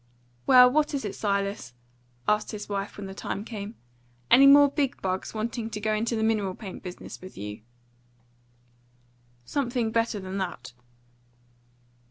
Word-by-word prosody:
"Well, 250 -1 +9
what 295 +3 +1
is 270 - -3
it, 205 - -3
Silas?" 200 - -2 0.5
asked 210 +1 +1
his 210 -1 -6
wife 200 0 -4
when 205 - -6
the 195 - -7
time 200 +1 -5
came. 215 -1 -7 0.6
"Any 275 +3 +8
more 285 +1 +8
big 280 -2 -1
bugs 185 +3 -3
wanting 225 +1 -3
to 215 -1 -5
go 215 +1 0
into 225 +2 0
the 220 - 0
mineral 210 -4 +1
paint 195 -4 -8
business 180 -1 -9
with 185 +1 -11
you?" 105 +2 -6 1.8
"Something 245 - -1
better 230 -2 0
than 190 +1 -5
that." 130 -10 -5
215 Hz, 150 wpm, -27 LUFS, 195-235 Hz, 1.8 s, Well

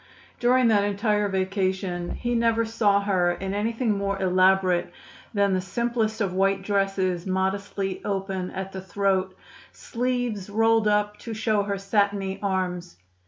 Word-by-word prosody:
During 250 0 +4
that 205 -2 +4
entire 205 +1 +1
vacation 190 -2 -1
he 240 0 -2
never 230 -1 +2
saw 210 -3 +2
her 185 -3 +1
in 190 +2 -4
anything 225 +3 0
more 200 0 -2
elaborate 185 -1 +3 0.4
than 200 -2 +2
the 185 - +1
simplest 225 +3 -1
of 195 -3 0
white 195 +1 +1
dresses 195 -3 0
modestly 190 +1 -2
open 195 -2 -3
at 190 0 -5
the 190 - -6
throat, 190 -1 -1 0.4
sleeves 245 -5 -2
rolled 225 +1 +3
up 210 0 +1
to 230 -2 -6
show 215 -1 +1
her 200 0 -2
satiny 195 -1 0
arms. 180 - -2
200 Hz, 140 wpm, -25 LUFS, 190-215 Hz, 0.4 s, During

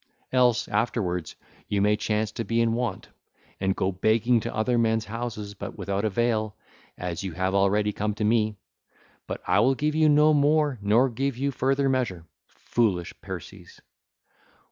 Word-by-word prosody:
Else, 125 -2 +3
afterwards, 100 -6 -1 0.3
you 100 - 0
may 105 +1 +3
chance 110 0 -1
to 115 - -4
be 115 +1 -1
in 115 -1 +2
want, 120 -4 -3 0.5
and 95 0 0
go 95 +1 0
begging 110 +5 +2
to - - -4
other 110 +3 +1
men's 115 -1 +1
houses, 110 -2 -5
but 100 - -8
without 100 +1 -2
avail; 110 0 0 0.4
as 90 -2 -4
you 95 -3 -4
have 95 +2 -1
already 100 +2 +2
come 105 0 -2
to 105 - -3
me. 110 0 +2 0.7
But - - -5
I 90 +3 +3
will 130 +5 +3
give 150 +3 0
you 155 0 +4
no 150 +1 +5
more 145 -2 +2
nor 110 +6 +4
give 135 +1 -2
you 140 +2 0
further 135 +2 +1
measure. 120 -11 -1 0.2
Foolish 100 -8 -1
Perses! - - -9
110 Hz, 165 wpm, -26 LUFS, 100-125 Hz, 0.7 s, no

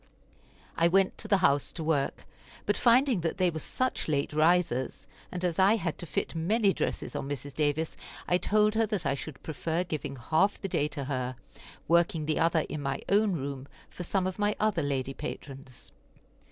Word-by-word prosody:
I 165 - +5
went 190 +2 +3
to 215 - -5
the 205 -2 +4
house 140 0 +2
to 165 - -5
work, 150 -3 0 0.4
but 205 - +1
finding 245 -3 +4
that 165 - -2
they 180 -2 +3
were 160 - -4
such 255 - -2
late 145 -1 0
risers, 155 -5 +2 0.3
and 180 0 -3
as 175 -1 -1
I 195 +4 +6
had 180 -7 -3
to 175 - -6
fit - - -2
many 195 +5 +2
dresses - - -3
on 135 - -3
Mrs. 145 0 -5
Davis, 155 +2 0 0.3
I 180 - +3
told 210 +1 +3
her 225 0 +2
that 200 -6 -2
I 140 - +2
should 140 0 -7
prefer 160 +3 -2
giving 150 -5 -4
half 160 +11 +1
the 195 - -3
day 150 -5 +1
to 150 -2 -5
her, 130 -2 -2 0.5
working 170 -1 +3
the 155 0 0
other 165 0 +3
in 155 - -5
my 135 -1 -3
own 205 0 +3
room 140 -3 -4 0.2
for - - -8
some 185 +1 0
of 185 +2 -3
my 205 0 +1
other 210 -5 +2
lady 135 -2 -1
patrons. 135 -3 -8
165 Hz, 195 wpm, -29 LUFS, 145-195 Hz, 0.5 s, I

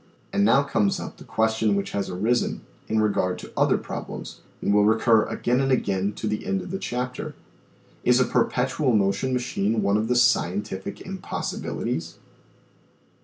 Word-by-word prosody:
And 200 - +3
now 140 -8 +5
comes 105 -8 +1
up - - -7
the - - -12
question 110 -1 +1
which 100 - -2
has 100 - -2
arisen 110 +7 0 0.3
in 110 - +1
regard 90 -3 +1
to - - -10
other - - +3
problems, - - -7 0.2
and 100 - +1
will 105 0 +5
recur 110 +1 +4
again 125 +1 0
and 135 0 +1
again 100 -5 +1
to 110 - -6
the 105 0 -2
end 95 0 -1
of - - -8
the 190 - -3
chapter: 125 -2 -4 0.7
Is 125 0 +4
a 130 - +4
perpetual 125 +2 +1
motion 105 +5 +1
machine 115 -4 0
one 100 +1 +3
of 110 +1 0
the 125 - +1
scientific 100 -4 +1
impossibilities 190 0 -4
110 Hz, 165 wpm, -25 LUFS, 100-125 Hz, 0.7 s, now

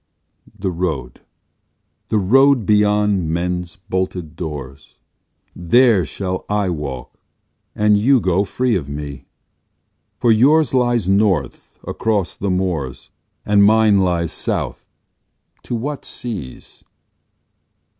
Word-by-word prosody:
The 95 -1 -2
road, 80 -9 -4 0.9
the 110 - +1
road, 130 +4 +4
beyond 105 -3 +2
men's 90 +2 -2
bolted 90 -3 -3
doors, 70 -5 -8 0.6
There 105 +2 +3
shall 95 -2 -4
I 105 -3 0
walk 70 -6 -6 0.6
and 105 -1 +3
you 130 +5 +4
go 95 -1 +1
free 120 +4 0
of 75 -7 -3
me, 70 -1 -7 0.9
For 120 - +3
yours 140 +8 +4
lies 120 -6 +1
North 95 - 0
across 105 -5 -1
the 100 - -3
moors, 90 -8 -3 0.3
And 105 -1 +4
mine 110 -1 +5
lies 85 -3 0
South. 75 - -4 0.8
To 120 - -3
what 140 +5 -4
seas? 100 - -8
95 Hz, 105 wpm, -19 LUFS, 85-110 Hz, 0.9 s, mine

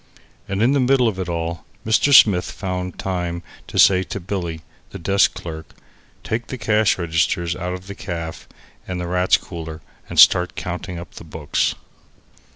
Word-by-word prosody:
And 100 +2 0
in 125 - +4
the 140 - +2
middle 130 -1 +3
of 100 -4 -2
it 90 -2 -3
all, 85 0 -3 0.2
Mr. 110 +6 +3
Smith 100 -9 +6
found 90 -2 -4
time 90 -2 -3 0.2
to - - -6
say 95 -2 +6
to 95 - -5
Billy, 85 -4 -4 0.3
the - - -8
desk 95 +4 +2
clerk: 80 -2 -8 0.5
"Take 115 +2 -3
the 130 - -5
cash 110 -2 +2
registers 85 0 0
out 90 0 -4
of 90 0 -7
the 100 - -7
caff 85 -4 -6 0.4
and 90 -1 -4
the 90 - -3
Rats' 90 +1 +3
Cooler 80 -3 -8 0.3
and - - -1
start 90 0 +6
counting 90 0 -5
up 85 -2 -9
the - - -10
books." 80 -2 -1
90 Hz, 170 wpm, -21 LUFS, 85-100 Hz, 0.5 s, Smith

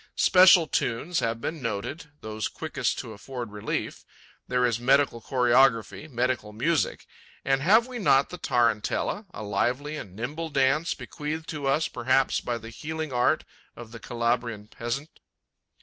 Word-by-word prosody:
Special 180 -2 +7
tunes 150 +4 -1
have 115 0 -1
been 155 +5 -4
noted, 115 +8 -4
those 110 -1 -3
quickest - - -2
to 110 - -6
afford 120 +1 -7
relief. 105 0 -4 0.4
There 125 0 +2
is 120 -2 0
medical 135 -1 +3
choreography, 125 +3 +2
medical 120 -4 -1
music. 155 +9 0 0.4
And 135 0 +2
have 215 +9 +5
we 250 -1 -7
not 140 -9 +3
the 180 - -7
tarantella, 120 - 0
a 110 - -7
lively 125 +9 -1
and 95 -9 -9
nimble 150 +9 -4
dance, 145 +4 +2
bequeathed 155 +1 -5
to 145 -3 -3
us 150 +4 +2
perhaps 130 +2 +1
by 120 -1 -2
the 115 0 -10
healing 155 +2 -5
art 125 0 +2 0.3
of 120 -2 -10
the 115 - -9
Calabrian 115 -3 -2
peasant? 120 +8 -5
130 Hz, 150 wpm, -26 LUFS, 115-155 Hz, 0.4 s, Special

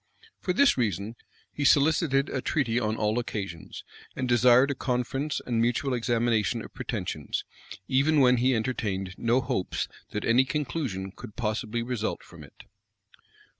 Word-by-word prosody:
For 180 - -1
this 255 - +4
reason, 105 0 -1 0.4
he 145 - -3
solicited 145 -1 +3
a 130 - -3
treaty 120 -7 0
on 110 -2 -1
all 110 +2 +1
occasions, 95 -8 -6 0.3
and 130 - -2
desired 125 +3 +5
a - - 0
conference 135 +3 -2
and 115 -2 0
mutual 120 +3 +1
examination 115 -3 +1
of - - -12
pretensions, - - -4 0.4
even 140 +3 +3
when 125 -2 +5
he 130 +2 +3
entertained 105 -5 -2
no 120 +3 +2
hopes 125 -7 -2 0.2
that 105 - -4
any 120 +3 +5
conclusion 130 -9 -3
could 105 - -11
possibly 110 0 -2
result 120 -3 -3
from - - -13
it. - - -15
120 Hz, 145 wpm, -27 LUFS, 110-135 Hz, 0.4 s, desired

